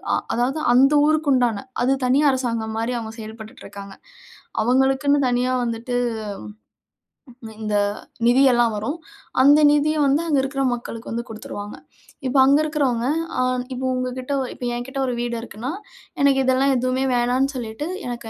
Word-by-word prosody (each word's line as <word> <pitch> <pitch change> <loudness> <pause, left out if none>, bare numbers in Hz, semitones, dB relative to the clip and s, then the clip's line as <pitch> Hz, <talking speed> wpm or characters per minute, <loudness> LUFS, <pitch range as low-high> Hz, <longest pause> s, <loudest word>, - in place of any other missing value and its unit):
அ - - +2 0.2
அதாவது 260 +6 0
அந்த 270 +3 +5
ஊருக்கு 310 -1 +2
உண்டான 240 -4 +1 0.2
அது 265 +2 +3
தனி 260 +3 +3
அரசாங்கம் 230 -4 -2
மாரி 230 +2 -1
அவங்க 220 -1 -7
செயல்பட்டுட்டு 220 0 -10
இருக்காங்க. 200 -1 -10 0.7
அவங்களுக்குன்னு 265 +4 +2
தனியா 245 +1 0
வந்துட்டு 235 +1 -3 1.7
இந்த 215 -1 -2 0.5
நிதியெல்லாம் 240 -2 +4
வரும். 250 +10 -3 0.5
அந்த 290 +3 +6
நிதியை 305 +1 +1
வந்து 280 +4 +2
அங்க 295 -3 +2
இருக்கிற 275 0 -2
மக்களுக்கு 235 -1 -7
வந்து 235 +1 -3
குடுத்துருவாங்க. 205 -2 -8 0.5
இப்ப 260 +2 -1
அங்க 280 +2 +5
இருக்கிறவங்க, 275 -6 0 0.3
அ - - +2 0.3
இப்போ 255 +1 -4
உங்ககிட்ட 255 +1 -4
ஒ - - -3
இப்போ - - -8
என்கிட்டே 265 +3 -5
ஒரு 250 - -2
வீடு 240 0 -2
இருக்குன்னா, 230 +2 -6 0.5
எனக்கு 280 -1 +4
இதெல்லாம் 260 +1 +3
எதுவுமே 255 +1 0
வேணான்னு 245 +2 +1
சொல்லிட்டு, 240 +3 -5 0.2
எனக்கு 240 -2 -6
250 Hz, 145 wpm, -22 LUFS, 230-270 Hz, 1.7 s, அந்த